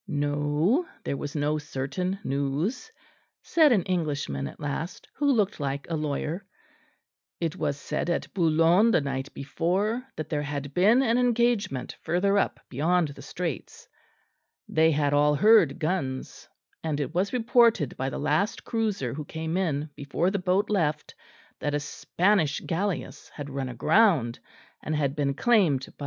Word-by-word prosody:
No, 145 - +1 0.2
there - - -2
was 145 +1 -6
no 150 +1 0
certain 150 +7 -3
news, 145 - -2 0.5
said 315 -4 +4
an 205 -7 +3
Englishman 145 - -2
at - - -11
last, 150 +4 -5
who 285 0 +1
looked 210 -8 +1
like 140 -1 -3
a - - +1
lawyer; 155 +4 -3 1.0
it 165 -2 -2
was 140 - -2
said 160 - -3
at 170 - -2
Boulogne 170 +4 +4
the 230 - +4
night 135 -1 -4
before 190 - -1
that 155 - -5
there 150 -1 -1
had 145 -1 -5
been 215 - +4
an 235 -1 +2
engagement 235 - +1
further 195 +5 +2
up - - -1
beyond 160 +5 +1
the 140 - -10
Straits; 170 -6 -5 0.8
they 160 0 +3
had 145 -2 +1
all 150 +1 +4
heard 205 -5 +5
guns; 155 -6 -3 0.3
and 155 -2 -1
it 145 +2 -3
was 185 +3 0
reported 235 - +3
by 135 +1 -2
the - - -5
last 155 +8 0
cruiser 210 - -1
who 150 +2 -5
came 160 +2 -4
in 155 -5 -1
before 150 +6 -1
the 200 - -1
boat 185 +3 +1
left 155 -7 0 0.5
that 145 0 -1
a - - +1
Spanish 165 +2 0
galleasse 190 +2 -3
had 145 -1 -6
run 135 -1 -3
aground 130 - +3 0.4
and 155 - -2
had 140 -2 0
been 140 -2 0
claimed 175 - +3
by - - -15
M. - - -21
160 Hz, 155 wpm, -27 LUFS, 145-195 Hz, 1.0 s, heard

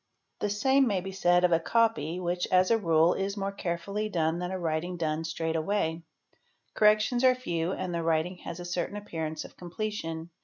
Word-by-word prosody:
q - - 0
The - - -3
same 265 +5 +3
may 200 -4 +1
be 190 +1 -6
said 175 -2 +3
of 180 - +4
a 165 - +4
copy, 180 -5 +1
which, 175 0 -1
as 185 +2 +4
a 230 - +5
rule, 165 -2 +4
is 195 +1 -3
more 195 0 -2
carefully 200 +3 -3
lone 165 -3 0
than 180 0 -3
a 190 - -3
writing 170 +1 -2
done 160 -1 -1
straight 165 0 -2
away; 165 -1 0 0.7
corrections 215 +4 +3
are 255 -1 +6
few 175 -9 -2
and 185 -2 -3
the 170 - -1
Writing 165 +2 0
has 170 0 -7
a 175 - -6
certain 175 +3 -3
appearance 160 -6 -4
of - - -13
completion. 175 -3 -5
175 Hz, 200 wpm, -28 LUFS, 165-205 Hz, 0.7 s, are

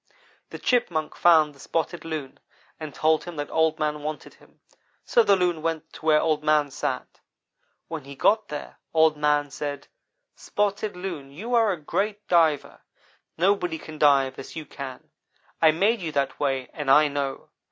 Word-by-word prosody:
"The - - -7
Chipmunk 175 -11 0
found 160 -3 +5
the 140 - -21
Spotted 165 +4 -3
Loon 155 -5 -6 0.4
and 155 -2 -6
told 155 +2 +1
him 175 -1 -7
that 145 -1 -5
Old 160 -1 +2
man 150 -1 -1
wanted 155 +1 -6
him, - - -23 0.5
so 235 - +4
the 200 -3 +4
Loon 175 -4 0
went 160 0 -3
to 160 - -12
where 155 -1 +6
Old 155 -1 0
man 150 -2 +2
sat. - - -4 0.7
When 160 -4 -6
he 140 0 -10
got 215 +10 +2
there, 150 - -7 0.2
Old 160 -1 +5
man 150 -1 +1
said: 145 0 -5 0.5
"'Spotted 205 -1 -2
Loon 175 -7 -6
you 210 - -6
are 225 -3 +4
a 180 - -2
great 205 +7 -2
diver. 160 -5 +2 0.6
Nobody 180 -2 +1
can 155 -1 -11
dive 135 -3 +3
as - - -9
you 160 -1 -6
can. 135 -2 -9 0.5
I 160 - +7
made 200 +8 +2
you 165 -3 -3
that 140 -1 -1
way 135 -3 -1
and 145 -3 -4
I 150 +3 +7
know. 140 -1 -4
155 Hz, 175 wpm, -25 LUFS, 145-175 Hz, 0.7 s, I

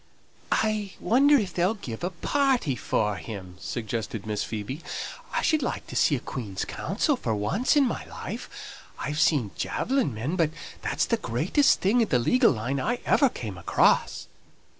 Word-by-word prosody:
"I 215 -3 0
wonder 270 +10 +5
if 200 -9 +1
they'll 180 +5 +1
give 120 - -7
a 180 - 0
party 245 - +1
for 105 -3 0
him!" 90 +1 -8
suggested 110 -1 -4
Miss 105 -1 -2
Phoebe. 115 +8 -5 0.5
"I - - -1
should 310 -2 +3
like 250 - -3
to - - -9
see 145 - +4
a - - -2
Queen's 105 -7 -5
counsel - - 0
for 110 - -2
once 180 - +1
in 285 -2 +5
my 240 - -2
life. - - -7 0.5
I - - -4
have 150 0 -2
seen 140 - +3
javelin 265 - 0
men, 120 +10 -3
but 165 -4 +3 0.3
that's - - 0
the - - +1
greatest 290 -2 +2
thing 220 +6 +3
in 225 - +2
the 125 - +4
legal 240 - +4
line 125 +4 -2
I 240 - 0
ever 275 - +4
came 105 - -6
across." - - +2
150 Hz, 175 wpm, -26 LUFS, -, 0.5 s, wonder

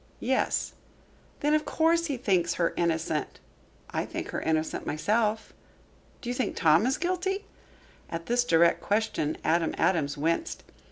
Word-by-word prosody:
"Yes." - - 0 0.7
"Then, 295 +1 +2
of 305 0 +3
course, 335 +2 +2
he 280 -4 -2
thinks 185 -7 +1
her 170 -1 +1
innocent." 160 -2 -1 0.5
"I - - -1
think - - -5
her - - -3
innocent 160 0 -1
myself." 215 +7 0 0.7
"Do 240 - -4
you - - -1
think 250 0 -2
Tom 165 +6 +4
is 260 - +1
guilty?" 370 +3 -1 0.6
At 165 0 -5
this 245 +1 +2
direct 170 -6 +4
question 205 -8 0
Adam 165 0 +1
Adams 150 -6 +1
winced. 165 - -1
195 Hz, 145 wpm, -28 LUFS, 165-265 Hz, 0.7 s, Tom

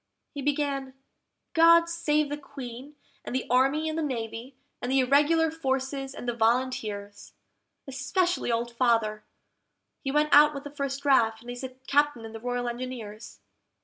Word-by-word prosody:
He 285 - -5
began, 275 -2 -1 0.6
"GOD 335 +1 +6
save 305 -3 0
the 290 - -3
Queen, 270 0 -9 0.3
and - - -5
the 260 - -1
Army 270 +5 +3
and 315 - -2
the 325 - -1
Navy, 240 -2 -4 0.3
and 245 - -2
the 270 - +3
Irregular 295 +5 +3
Forces 270 -3 -2
and 245 - -7
the 240 - 0
Volunteers! 225 -3 -1 0.5
Especially 285 +3 -1
Old 235 +1 -2
Father 225 -3 +1 0.8
(he 270 - -2
went 300 +1 +2
out 295 +1 +7
with 280 - -6
the 290 - -8
first 275 -1 -3
draft, 225 -6 +3
and 240 +1 -8
he's 245 +1 -7
a 260 - -3 0.2
Captain 290 -5 +1
in 225 - -9
the 225 - -7
Royal 245 +1 -2
Engineers"). 235 -3 -7
265 Hz, 160 wpm, -27 LUFS, 240-295 Hz, 0.8 s, out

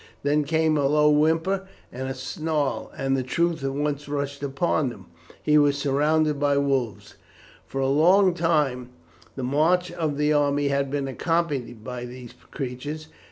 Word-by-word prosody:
Then 145 +1 +2
came 160 +1 +2
a 140 -2 +2
low 150 +1 +4
whimper 165 +6 +2 0.2
and 130 +1 -5
a 135 - -4
snarl, 150 +1 -2
and 135 0 0
the 135 - 0
truth 165 +4 -1
at 135 0 -2
once 145 0 -2
rushed 140 -1 -3
upon 140 0 0
him. 100 -6 -11 0.4
He 150 0 +4
was 145 -1 +3
surrounded 150 +2 +1
by 145 -1 +2
wolves. 135 -5 -1 0.5
For 135 - -3
a 135 - +1
long 180 +7 +4
time 150 -7 0 0.5
the 130 - -5
march 165 +7 +2
of 160 -4 -2
the 150 +1 +2
army 145 -1 +2
had 140 0 0
been 140 0 -2
accompanied 135 -6 -2
by 125 0 -5
these 125 -1 -10 0.2
creatures. 145 +3 -5
145 Hz, 160 wpm, -25 LUFS, 135-155 Hz, 0.5 s, low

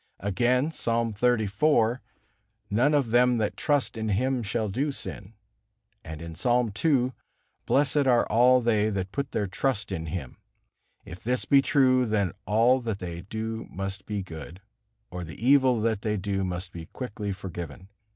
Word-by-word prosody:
Again, 125 - +1
Psalm 115 -5 -1
xxxiv: 115 +2 +2 0.7
"None 125 +8 +3
of 135 -6 +1
them 125 0 +4
that 105 -2 -1
trust 145 -5 0
in 110 -1 -3
Him 125 +5 +1
shall 110 +1 -1
do 135 +9 -1
sin." 105 -5 -7 0.7
And 80 -1 -8
in 85 -1 -7
Psalm 120 +6 +1
ii: 130 -6 +3 0.6
"Blessed 140 0 +2
are 120 -2 +4
all 125 +2 +4
they 110 -2 +2
that 95 -2 -3
put 140 -2 -3
their 105 - -1
trust 110 +2 -2
in 80 -3 -4
Him." 75 -6 -5 0.7
If 90 - -9
this 125 +2 -1
be 140 -1 +5
true, 130 -3 +3
then 100 -4 +1 0.2
all 115 +5 +4
that 110 -4 -3
they 85 -3 -6
do 110 +3 -5
must 95 +1 -5
be 105 -2 -3
good, 85 0 -9 0.5
or 90 0 -5
the 80 -1 -8
evil 130 -1 +4
that 110 -2 0
they 105 -1 -1
do 95 0 -2
must 90 0 -4
be 80 -2 -8
quickly 105 -5 -5
forgiven. 90 -1 -7
110 Hz, 160 wpm, -27 LUFS, 95-125 Hz, 0.7 s, be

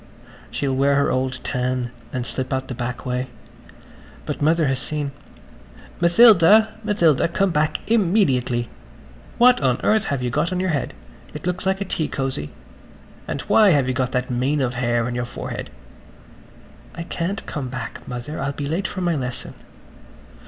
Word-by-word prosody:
She'll 135 -2 -1
wear 140 +1 +3
her 140 - +2
old 130 0 -1
tam 125 -1 -2 0.2
and 125 -2 -3
slip 125 +1 -4
out 130 0 -1
the - - -5
back 120 +1 -5
way. 125 0 -2 1.0
But - - -4
Mother 160 +2 +3
has 135 -2 +1
seen. 145 -1 -3 0.9
"Matilda. 210 +3 +6
Matilda. 170 -10 +3
Come 185 +3 +1
back 155 0 +1
im 215 -6 +2
me 210 0 +5
diately! 125 -3 0 0.7
What 245 -4 +6
on 130 -3 +2
earth 215 -1 +3
have 135 -3 -2
you 125 - -1
got 150 +7 0
on 180 - -1
your 185 -1 0
head? 145 - -2 0.4
It - - -7
looks 180 +2 -2
like 190 +1 0
a - - -1
tea 160 -4 -2
cosy. 135 - -3 0.8
And - - -3
why 215 -2 +5
have 140 -3 +2
you 130 - 0
got 130 -1 -1
that 125 0 -1
mane 130 +5 0
of 125 -3 0
hair 120 -1 0
on 125 - -3
your 120 0 -2
forehead." 120 - -6 1.3
"I 170 - -5
can't 180 +4 -3
come 140 -4 -4
back, 130 -2 -6
Mother. 125 +5 -5
I'll 140 +1 -2
be 145 - -4
late 165 +7 -1
for 185 - -5
my 175 -2 +1
lesson." 125 -3 -5
140 Hz, 175 wpm, -22 LUFS, 125-170 Hz, 1.3 s, Matilda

